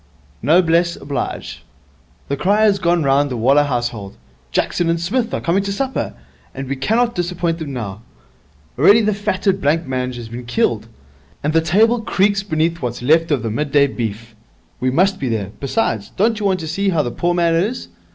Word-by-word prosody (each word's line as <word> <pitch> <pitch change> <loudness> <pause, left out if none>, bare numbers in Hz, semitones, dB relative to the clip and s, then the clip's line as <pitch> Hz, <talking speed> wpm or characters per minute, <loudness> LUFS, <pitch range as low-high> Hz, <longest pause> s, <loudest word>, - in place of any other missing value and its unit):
'Noblesse 170 +4 +3
oblige. 140 0 -5 0.6
The 140 - -1
cry 200 +8 +2
has 205 -2 +3
gone 175 -2 +2
round 140 +1 +2
the 125 - -3
Waller 135 +6 +4
household, 120 -6 -3 0.3
"Jackson 170 - 0
and 165 0 +1
Psmith 225 +7 -1
are - - -2
coming 175 +4 +1
to 200 0 -3
supper," 265 +6 -2 0.4
and 135 0 -5
we 140 - -2
cannot 230 - +1
disappoint 175 -1 -2
them 155 -3 -5
now. 105 -5 -5 0.8
Already 205 +10 +6
the 215 0 +1
fatted 200 -1 -1
blanc 165 +2 +1
mange 130 -1 -3
has 120 -2 -7
been 120 +2 -8
killed, 115 -2 0 0.6
and 150 +2 0
the 165 - +4
table 220 +9 +3
creaks 200 -1 +1
beneath 165 -3 -1
what's 120 0 -4
left 165 +5 +3
of 140 -6 0
the 115 - -2
midday 145 +3 +2
beef. 115 -3 -5 0.5
We 130 - +1
must 190 +8 +2
be 130 - -2
there; 105 -4 -2
besides, 115 - -1
don't 220 +2 +2
you 205 - 0
want 185 -2 0
to 160 - -5
see 195 +5 0
how 165 -5 +1
the 120 - -3
poor 175 +6 0
man 170 -1 +2
is? 200 +10 -1
165 Hz, 190 wpm, -19 LUFS, 130-195 Hz, 0.8 s, Already